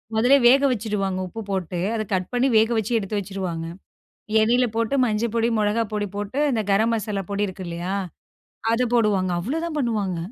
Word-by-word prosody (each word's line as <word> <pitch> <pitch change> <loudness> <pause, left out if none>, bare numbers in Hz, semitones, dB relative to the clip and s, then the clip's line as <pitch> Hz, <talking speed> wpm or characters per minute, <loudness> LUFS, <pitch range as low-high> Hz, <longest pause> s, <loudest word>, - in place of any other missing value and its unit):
முதலே 245 +5 +5
வேக 265 +3 +6
வச்சுடுவாங்க. 205 -5 -2
உப்பு 225 +5 -7
போட்டு. 185 -2 -2 0.2
அத 220 - -1
கட் 185 -1 -1
பண்ணி 245 +2 +2
வேக 220 +1 +4
வச்சு 220 +1 -2
எடுத்து 205 0 -3
வச்சுருவாங்க. 185 -4 -4 0.8
எண்ணெயில 245 +3 +3
போட்டு 230 +3 0
மஞ்ச 220 -1 0
பொடி, 230 0 +2
மிளகா 210 +2 +1
பொடி 210 -1 -1
போட்டு 205 +6 -4
இந்த 220 -3 0
கரம் 220 +4 +3
மசாலா 210 -2 -2
பொடி 200 +1 0
இருக்கு 190 -1 -7
இல்லயா! 170 +3 -3 0.8
அத 230 +2 +2
போடுவாங்க. 205 -5 +2
அவ்ளோதான் 315 - -3
பண்ணுவாங்க. 210 -9 -1
210 Hz, 170 wpm, -23 LUFS, 195-230 Hz, 0.8 s, வேக